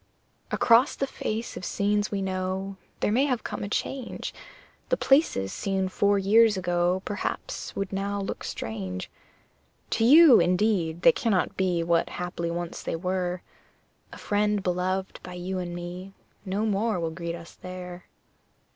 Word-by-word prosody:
Across 235 Hz, +3 st, +4 dB
the 275 Hz, -, -1 dB
face 225 Hz, -3 st, -4 dB
of -, -, -7 dB
scenes 205 Hz, +2 st, 0 dB
we 200 Hz, -1 st, -2 dB
know 190 Hz, +1 st, -2 dB, 0.3 s
There -, -, +2 dB
may 255 Hz, +6 st, +3 dB
have 250 Hz, -5 st, -1 dB
come -, -, -5 dB
a 200 Hz, -, -4 dB
change 260 Hz, +3 st, -3 dB, 0.6 s
The -, -, +2 dB
places 270 Hz, -, +2 dB
seen 190 Hz, -1 st, -1 dB
four 200 Hz, +2 st, +2 dB
years 210 Hz, +2 st, +5 dB
ago 175 Hz, +1 st, +1 dB
Perhaps 205 Hz, -1 st, -4 dB
would 195 Hz, 0 st, -3 dB
now 200 Hz, +1 st, -2 dB
look 195 Hz, -, -4 dB
strange. 95 Hz, -5 st, -5 dB, 0.8 s
To 225 Hz, -, +1 dB
you, 285 Hz, +1 st, +8 dB
indeed, 175 Hz, -2 st, +1 dB
they 250 Hz, -, +9 dB
cannot 210 Hz, -6 st, 0 dB
be 180 Hz, -3 st, +1 dB
What 170 Hz, 0 st, +2 dB
haply 175 Hz, -1 st, -3 dB
once 170 Hz, 0 st, -4 dB
they -, -, -3 dB
were: 180 Hz, 0 st, -2 dB, 0.7 s
A -, -, -10 dB
friend 210 Hz, -1 st, 0 dB
beloved 185 Hz, +1 st, -1 dB
by 180 Hz, -, -9 dB
you 185 Hz, +1 st, -3 dB
and 175 Hz, -1 st, -4 dB
me 180 Hz, +2 st, -7 dB, 0.3 s
No 200 Hz, +3 st, -1 dB
more 210 Hz, -1 st, 0 dB
will 165 Hz, -1 st, -2 dB
greet 170 Hz, 0 st, -4 dB
us 170 Hz, 0 st, -11 dB
there. 180 Hz, -1 st, -8 dB
190 Hz, 155 wpm, -27 LUFS, 175-210 Hz, 0.8 s, they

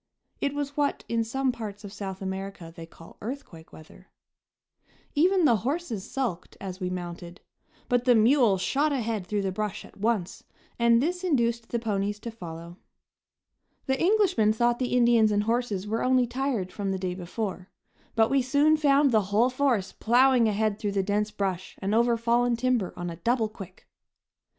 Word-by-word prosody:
It 280 Hz, 0 st, -1 dB
was 285 Hz, -1 st, -3 dB
what 290 Hz, -1 st, 0 dB
in 230 Hz, 0 st, 0 dB
some 265 Hz, +3 st, 0 dB
parts 215 Hz, -3 st, -7 dB
of 200 Hz, -1 st, -9 dB
South 195 Hz, -2 st, -6 dB
America 190 Hz, -3 st, -6 dB
they 165 Hz, -1 st, -9 dB
call 165 Hz, 0 st, -16 dB
"earthquake 210 Hz, -, -8 dB
weather." 160 Hz, +4 st, -15 dB, 1.1 s
Even 360 Hz, +3 st, +3 dB
the 235 Hz, -6 st, +5 dB
horses 250 Hz, -, -3 dB
sulked 235 Hz, -10 st, -4 dB
as 185 Hz, -1 st, -6 dB
we 180 Hz, -2 st, -2 dB
mounted; 175 Hz, -1 st, -7 dB, 0.5 s
but 245 Hz, 0 st, +1 dB
the 250 Hz, -2 st, +5 dB
mule 230 Hz, -2 st, +4 dB
shot 285 Hz, +11 st, +1 dB
ahead 225 Hz, -8 st, -2 dB
through 205 Hz, 0 st, -1 dB
the 190 Hz, -, -1 dB
brush 210 Hz, +1 st, -4 dB
at -, -, -17 dB
once, 210 Hz, -3 st, -1 dB, 0.4 s
and 235 Hz, +1 st, +4 dB
this 360 Hz, +3 st, -2 dB
induced 235 Hz, -8 st, 0 dB
the 235 Hz, -, -1 dB
ponies 205 Hz, -2 st, -2 dB
to 235 Hz, -, -6 dB
follow. 170 Hz, -4 st, -9 dB, 1.1 s
The 265 Hz, 0 st, -1 dB
Englishmen 360 Hz, -, +3 dB
thought 240 Hz, +1 st, +1 dB
the 250 Hz, -1 st, 0 dB
Indians 235 Hz, -3 st, +4 dB
and 205 Hz, 0 st, +1 dB
horses 225 Hz, -4 st, -1 dB
were 220 Hz, +2 st, -2 dB
only 255 Hz, -1 st, +3 dB
tired 240 Hz, -6 st, -2 dB
from 200 Hz, -2 st, -3 dB
the 190 Hz, -, -1 dB
day 185 Hz, -1 st, -3 dB
before, 185 Hz, +1 st, -5 dB, 0.5 s
but 225 Hz, -1 st, +3 dB
we 275 Hz, -1 st, +3 dB
soon 285 Hz, +5 st, +3 dB
found 285 Hz, -2 st, +4 dB
the 215 Hz, -4 st, +3 dB
whole 230 Hz, +5 st, +3 dB
force 250 Hz, -7 st, 0 dB
plowing 245 Hz, 0 st, +4 dB
ahead 215 Hz, 0 st, 0 dB
through 205 Hz, -2 st, -2 dB
the 195 Hz, -1 st, +1 dB
dense 205 Hz, +2 st, 0 dB
brush 190 Hz, -3 st, -3 dB
and 195 Hz, +2 st, -2 dB
over 235 Hz, +1 st, +3 dB
fallen 235 Hz, +1 st, +2 dB
timber 240 Hz, -5 st, 0 dB
on 175 Hz, 0 st, -4 dB
a 165 Hz, -, -8 dB
double 230 Hz, +5 st, +1 dB
quick. 195 Hz, -4 st, -12 dB
225 Hz, 175 wpm, -27 LUFS, 195-255 Hz, 1.1 s, the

